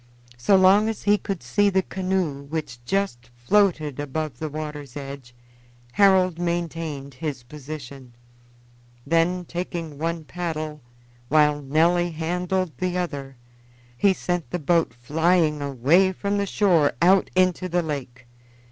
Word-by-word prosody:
So 195 Hz, +11 st, +4 dB
long 195 Hz, +3 st, +5 dB
as 220 Hz, -, -5 dB
he 205 Hz, 0 st, +3 dB
could 195 Hz, -8 st, -4 dB
see 200 Hz, +12 st, +2 dB
the 190 Hz, -1 st, +1 dB
canoe, 185 Hz, -7 st, -2 dB
which 140 Hz, -5 st, -5 dB
just 160 Hz, -10 st, -2 dB
floated 155 Hz, +1 st, +1 dB
above 145 Hz, +1 st, -4 dB
the 155 Hz, -1 st, -3 dB
water's 150 Hz, -3 st, -6 dB
edge, 135 Hz, -3 st, -8 dB, 0.6 s
Harold 185 Hz, -1 st, +4 dB
maintained 165 Hz, -5 st, -3 dB
his 140 Hz, -2 st, -5 dB
position; 135 Hz, -2 st, -9 dB, 0.9 s
then 175 Hz, +2 st, +1 dB
taking 170 Hz, -4 st, -5 dB
one 165 Hz, 0 st, -2 dB
paddle, 155 Hz, -2 st, -5 dB, 0.5 s
while 150 Hz, -1 st, +3 dB
Nelly 170 Hz, +5 st, +2 dB
handled 180 Hz, +2 st, -2 dB
the 180 Hz, 0 st, -1 dB
other, 140 Hz, -6 st, -4 dB, 0.6 s
he 195 Hz, +11 st, +4 dB
sent 175 Hz, -6 st, -2 dB
the 180 Hz, -, -2 dB
boat 165 Hz, -2 st, +1 dB
flying 155 Hz, +4 st, +1 dB
away 145 Hz, +8 st, +3 dB
from 200 Hz, +2 st, -1 dB
the 200 Hz, -, -1 dB
shore 175 Hz, -8 st, +3 dB
out 185 Hz, +2 st, +4 dB
into 185 Hz, 0 st, +2 dB
the 175 Hz, 0 st, +1 dB
lake. 130 Hz, -5 st, -6 dB
165 Hz, 130 wpm, -24 LUFS, 145-185 Hz, 0.9 s, long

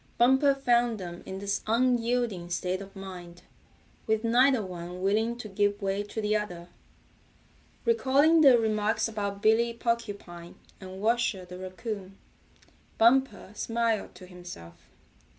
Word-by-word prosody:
Bumper 265 Hz, +3 st, +4 dB
found 240 Hz, -4 st, +1 dB
them 175 Hz, -1 st, -7 dB
in 190 Hz, -, -5 dB
this 200 Hz, +1 st, -2 dB
unyielding 235 Hz, -5 st, +1 dB
state 180 Hz, +2 st, -2 dB
of 195 Hz, 0 st, -11 dB
mind, 180 Hz, -3 st, -10 dB, 0.6 s
with 220 Hz, 0 st, +1 dB
neither 245 Hz, 0 st, +3 dB
one 180 Hz, 0 st, -7 dB
willing 220 Hz, +4 st, +1 dB
to 240 Hz, -, -7 dB
give 205 Hz, 0 st, 0 dB
way 195 Hz, 0 st, -1 dB
to 205 Hz, +2 st, -6 dB
the 210 Hz, 0 st, 0 dB
other. 180 Hz, -5 st, -4 dB, 1.2 s
Recalling 320 Hz, -, +4 dB
their 270 Hz, -5 st, +7 dB
remarks 215 Hz, -1 st, 0 dB
about 200 Hz, -2 st, -4 dB
Billy 230 Hz, +2 st, +3 dB
Porcupine 205 Hz, -8 st, -4 dB, 0.2 s
and 190 Hz, 0 st, -9 dB
Washer 220 Hz, -3 st, 0 dB
the 180 Hz, 0 st, -10 dB
Raccoon, 190 Hz, +1 st, -7 dB, 0.8 s
Bumper 235 Hz, -3 st, +3 dB
smiled 225 Hz, -2 st, -1 dB
to 185 Hz, +1 st, -12 dB
himself. 175 Hz, -, -12 dB
210 Hz, 130 wpm, -28 LUFS, 185-235 Hz, 1.2 s, their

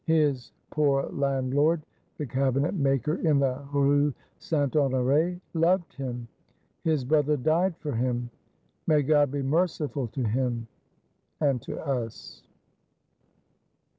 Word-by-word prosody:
His 145 Hz, -7 st, +2 dB, 0.2 s
poor 140 Hz, -3 st, +2 dB
landlord, 140 Hz, +3 st, +1 dB, 0.3 s
the 150 Hz, -, -3 dB
Cabinet 135 Hz, +3 st, 0 dB
maker 140 Hz, -, +1 dB
in 155 Hz, -4 st, +2 dB
the 135 Hz, 0 st, 0 dB
Rue 145 Hz, +1 st, +3 dB, 0.3 s
Saint 145 Hz, -3 st, -1 dB
Honore, 145 Hz, +5 st, +2 dB
loved 170 Hz, +1 st, +2 dB
him; 125 Hz, -3 st, -5 dB, 0.6 s
his 155 Hz, -5 st, +1 dB
Brother 150 Hz, +1 st, +2 dB
died 165 Hz, +6 st, +1 dB
for 150 Hz, -, -4 dB
him. 120 Hz, 0 st, -1 dB, 0.6 s
May 150 Hz, -3 st, +4 dB
God 145 Hz, 0 st, +4 dB
be 140 Hz, 0 st, -3 dB
merciful 150 Hz, -3 st, 0 dB
to 125 Hz, +3 st, -4 dB
him, 120 Hz, +1 st, -1 dB, 0.7 s
and 140 Hz, -5 st, +1 dB
to -, -, -6 dB
us! 120 Hz, -6 st, -4 dB
140 Hz, 115 wpm, -27 LUFS, 130-155 Hz, 0.7 s, May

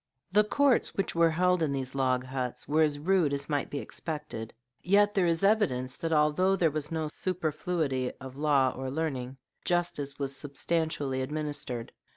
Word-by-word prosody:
] -, -, -55 dB
The 210 Hz, +2 st, +5 dB
courts 275 Hz, +4 st, +2 dB
which 195 Hz, -, -1 dB
were 170 Hz, 0 st, +4 dB
held 180 Hz, +2 st, +2 dB
in 155 Hz, -3 st, +1 dB
these 135 Hz, -1 st, -3 dB
log 130 Hz, -2 st, +1 dB
huts 125 Hz, -1 st, -4 dB
were 155 Hz, +2 st, +3 dB
as 150 Hz, -2 st, +2 dB
rude 165 Hz, -1 st, +2 dB
as 140 Hz, 0 st, -3 dB
might 145 Hz, -2 st, -1 dB
be 145 Hz, -, -4 dB
expected; 150 Hz, -7 st, -5 dB, 0.3 s
yet 205 Hz, +3 st, +4 dB
there 185 Hz, -3 st, +2 dB
is 165 Hz, +2 st, +1 dB
evidence 165 Hz, -, +2 dB
that 165 Hz, -, -3 dB
although 155 Hz, +5 st, +3 dB
there 170 Hz, -4 st, +2 dB
was 150 Hz, 0 st, -4 dB
no 160 Hz, -1 st, -1 dB
superfluity 155 Hz, -5 st, -1 dB
of 130 Hz, -1 st, -9 dB
law 140 Hz, -3 st, +3 dB
or 130 Hz, 0 st, -4 dB
of 130 Hz, -, -4 dB
learning, 135 Hz, -5 st, -3 dB, 0.3 s
justice 170 Hz, -6 st, -1 dB
was 140 Hz, -1 st, -2 dB
substantially 145 Hz, -2 st, -1 dB
administered. 145 Hz, -4 st, -3 dB
150 Hz, 180 wpm, -29 LUFS, 135-170 Hz, 0.3 s, The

